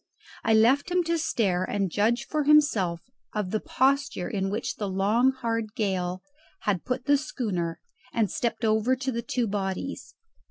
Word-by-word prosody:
I 225 Hz, -, +4 dB
left 255 Hz, +8 st, +4 dB
him 360 Hz, 0 st, +2 dB
to 335 Hz, 0 st, 0 dB
stare 190 Hz, -, +1 dB
and 195 Hz, -2 st, -1 dB
judge 230 Hz, +5 st, +1 dB
for 305 Hz, -2 st, -1 dB
himself 225 Hz, -, +4 dB, 0.3 s
of 205 Hz, -3 st, -2 dB
the 215 Hz, -, +1 dB
posture 265 Hz, -8 st, +1 dB
in 195 Hz, -2 st, -1 dB
which 210 Hz, +4 st, -3 dB
the 205 Hz, -4 st, -3 dB
long 210 Hz, +7 st, +3 dB
hard 230 Hz, -4 st, -3 dB
gale 185 Hz, -3 st, -1 dB, 0.4 s
had 195 Hz, -5 st, 0 dB
put 250 Hz, -1 st, -2 dB
the 285 Hz, 0 st, +5 dB
schooner 200 Hz, -, -3 dB, 0.3 s
and 220 Hz, -5 st, 0 dB
stepped 230 Hz, -1 st, -1 dB
over 220 Hz, +4 st, +3 dB
to 260 Hz, +1 st, -3 dB
the 235 Hz, -1 st, -2 dB
two 245 Hz, 0 st, -1 dB
bodies. 200 Hz, +4 st, -4 dB
220 Hz, 165 wpm, -27 LUFS, 195-260 Hz, 0.4 s, the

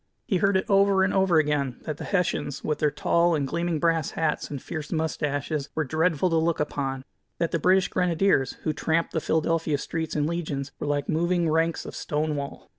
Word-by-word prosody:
He 190 Hz, -, +1 dB
heard 195 Hz, +1 st, +3 dB
it 190 Hz, -, -1 dB
over 195 Hz, -1 st, +4 dB
and 190 Hz, -, +1 dB
over 190 Hz, -3 st, +3 dB
again, 145 Hz, -4 st, +1 dB
that 155 Hz, -2 st, -4 dB
the -, -, -6 dB
Hessians, 180 Hz, -7 st, -1 dB
with 150 Hz, -, -1 dB
their 150 Hz, -, +3 dB
tall 170 Hz, +3 st, +2 dB
and 140 Hz, -3 st, -1 dB
gleaming 170 Hz, +2 st, -1 dB
brass 165 Hz, -2 st, +1 dB
hats 160 Hz, -2 st, 0 dB
and 145 Hz, -, -5 dB
fierce 150 Hz, +2 st, -6 dB
mustaches, 150 Hz, -2 st, -2 dB
"were 155 Hz, -, +1 dB
dreadful 160 Hz, +3 st, +1 dB
to 165 Hz, -, +3 dB
look 165 Hz, +1 st, +1 dB
upon," 135 Hz, -3 st, -2 dB, 0.3 s
that 170 Hz, -1 st, -1 dB
the 170 Hz, -, 0 dB
British 185 Hz, +3 st, +4 dB
Grenadiers, 175 Hz, -5 st, +2 dB
who 155 Hz, -, 0 dB
tramped 160 Hz, +2 st, 0 dB
the 160 Hz, -, 0 dB
Philadelphia 160 Hz, -1 st, +1 dB
streets 160 Hz, +2 st, -4 dB
in 150 Hz, -1 st, +1 dB
legions, 150 Hz, -4 st, -3 dB
"were -, -, -3 dB
like 145 Hz, -1 st, -1 dB
moving 170 Hz, +1 st, +1 dB
ranks 165 Hz, +1 st, +1 dB
of -, -, -8 dB
stone 150 Hz, 0 st, -1 dB
wall." 140 Hz, -1 st, -6 dB
160 Hz, 200 wpm, -26 LUFS, 145-170 Hz, 0.3 s, over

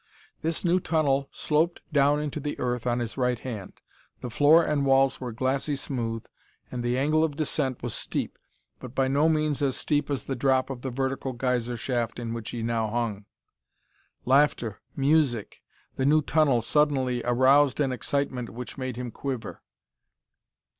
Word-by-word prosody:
This 165 Hz, +3 st, -2 dB
new 175 Hz, +2 st, +3 dB
tunnel 145 Hz, -5 st, +1 dB
sloped 160 Hz, +3 st, 0 dB
down 145 Hz, 0 st, +4 dB
into 150 Hz, 0 st, -3 dB
the 145 Hz, 0 st, -4 dB
earth 125 Hz, -1 st, -2 dB
on 120 Hz, 0 st, +1 dB
his 120 Hz, 0 st, -4 dB
right 125 Hz, -1 st, +1 dB
hand. 110 Hz, -6 st, -7 dB, 0.5 s
The 125 Hz, -, -5 dB
floor 155 Hz, +7 st, +5 dB
and 145 Hz, -2 st, 0 dB
walls 135 Hz, 0 st, +3 dB
were 125 Hz, -2 st, -4 dB
glassy 135 Hz, +5 st, -1 dB
smooth, 115 Hz, -5 st, -3 dB, 0.5 s
and 125 Hz, -, -3 dB
the 120 Hz, +1 st, 0 dB
angle 155 Hz, +4 st, +2 dB
of 155 Hz, -3 st, -1 dB
descent 140 Hz, -5 st, -1 dB
was 120 Hz, -3 st, -3 dB
steep, -, -, -3 dB, 0.4 s
but 130 Hz, 0 st, -10 dB
by 135 Hz, -1 st, +2 dB
no 145 Hz, +4 st, +3 dB
means 155 Hz, -2 st, +1 dB
as 135 Hz, -3 st, +1 dB
steep 145 Hz, -1 st, 0 dB
as 140 Hz, -3 st, -2 dB
the 135 Hz, -, -3 dB
drop 130 Hz, +1 st, +1 dB
of 125 Hz, -2 st, -6 dB
the 130 Hz, -, -3 dB
vertical 130 Hz, +1 st, -2 dB
geyser 125 Hz, -1 st, -1 dB
shaft 120 Hz, 0 st, -2 dB
in 115 Hz, -1 st, -4 dB
which 115 Hz, -2 st, -5 dB
he 115 Hz, -2 st, -4 dB
now 115 Hz, -1 st, 0 dB
hung. 105 Hz, -2 st, -2 dB, 1.0 s
Laughter, 130 Hz, -5 st, +2 dB
music, 140 Hz, -6 st, +1 dB, 0.4 s
the 130 Hz, -, 0 dB
new 155 Hz, +1 st, +4 dB
tunnel 135 Hz, -4 st, +2 dB
suddenly 130 Hz, -3 st, +2 dB
aroused 130 Hz, +3 st, +4 dB
an 140 Hz, -3 st, +2 dB
excitement 130 Hz, -1 st, -2 dB
which 125 Hz, +3 st, -8 dB
made 130 Hz, -2 st, -3 dB
him 125 Hz, -1 st, -5 dB
quiver. 130 Hz, -5 st, -5 dB
130 Hz, 165 wpm, -26 LUFS, 120-145 Hz, 1.0 s, floor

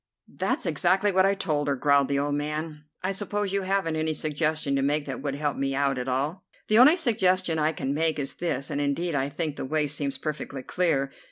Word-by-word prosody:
"That's -, -, -1 dB
exactly 190 Hz, +3 st, +2 dB
what 190 Hz, 0 st, +4 dB
I 200 Hz, -, +2 dB
told 150 Hz, -7 st, -1 dB
her," 140 Hz, -, +1 dB
growled 140 Hz, +1 st, +3 dB
the 140 Hz, -, 0 dB
old 145 Hz, +1 st, 0 dB
man. 150 Hz, +1 st, -4 dB, 0.2 s
"I 190 Hz, -, 0 dB
suppose 205 Hz, 0 st, -2 dB
you 200 Hz, -, +1 dB
haven't 190 Hz, -4 st, 0 dB
any 155 Hz, 0 st, 0 dB
suggestion 155 Hz, -1 st, 0 dB
to 135 Hz, -, +1 dB
make 145 Hz, +2 st, 0 dB
that 135 Hz, -3 st, -5 dB
would 140 Hz, -1 st, -2 dB
help 145 Hz, 0 st, -2 dB
me 135 Hz, 0 st, -1 dB
out 140 Hz, -2 st, +1 dB
at 125 Hz, -, -4 dB
all?" 145 Hz, +8 st, -2 dB, 0.3 s
"The 215 Hz, +1 st, +5 dB
only 295 Hz, +8 st, +8 dB
suggestion 185 Hz, -, +2 dB
I 155 Hz, +1 st, +2 dB
can 140 Hz, -3 st, -3 dB
make 160 Hz, +1 st, 0 dB
is 140 Hz, -2 st, -3 dB
this, 140 Hz, -5 st, -2 dB
and 145 Hz, 0 st, -1 dB
indeed 155 Hz, +4 st, -1 dB
I 140 Hz, -1 st, 0 dB
think 145 Hz, 0 st, -3 dB
the -, -, -4 dB
way 155 Hz, +2 st, +1 dB
seems 140 Hz, -1 st, -2 dB
perfectly 145 Hz, -3 st, -5 dB
clear. 140 Hz, -5 st, 0 dB
150 Hz, 225 wpm, -26 LUFS, 140-180 Hz, 0.3 s, only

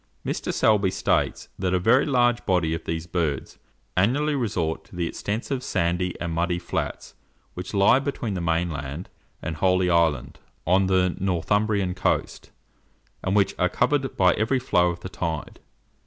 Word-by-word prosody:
Mr. -, -, -2 dB
Selby 105 Hz, -3 st, +3 dB
states -, -, 0 dB
that 95 Hz, -1 st, +1 dB
a -, -, +2 dB
very 115 Hz, -, +4 dB
large 120 Hz, -3 st, +2 dB
body 90 Hz, -4 st, +2 dB
of 80 Hz, 0 st, -5 dB
these 80 Hz, 0 st, -3 dB
birds 80 Hz, -6 st, -2 dB, 0.4 s
annually 135 Hz, +11 st, +2 dB
resort 95 Hz, -, -1 dB
to -, -, -16 dB
the 85 Hz, -1 st, -1 dB
extensive 115 Hz, +9 st, -3 dB
sandy 90 Hz, -4 st, -1 dB
and 85 Hz, -1 st, -3 dB
muddy 85 Hz, +1 st, 0 dB
flats 85 Hz, -, -4 dB, 0.4 s
which 90 Hz, +3 st, -6 dB
lie 100 Hz, +6 st, +5 dB
between 135 Hz, -6 st, -3 dB
the 90 Hz, -, -3 dB
mainland 80 Hz, -2 st, -2 dB, 0.3 s
and 80 Hz, -, -4 dB
Holy 90 Hz, +1 st, +2 dB
Island, 80 Hz, -6 st, +1 dB, 0.3 s
on 95 Hz, +2 st, +3 dB
the 90 Hz, -1 st, +2 dB
Northumbrian 100 Hz, +1 st, +1 dB
coast, 90 Hz, -, -1 dB, 0.7 s
and 95 Hz, +1 st, 0 dB
which 100 Hz, -2 st, +3 dB
are 90 Hz, -, +3 dB
covered 135 Hz, +4 st, 0 dB
by 90 Hz, -2 st, +5 dB
every 110 Hz, +5 st, +1 dB
flow 90 Hz, -9 st, +2 dB
of 85 Hz, 0 st, -5 dB
the -, -, -5 dB
tide. 80 Hz, -4 st, -4 dB
90 Hz, 155 wpm, -25 LUFS, 85-105 Hz, 0.7 s, lie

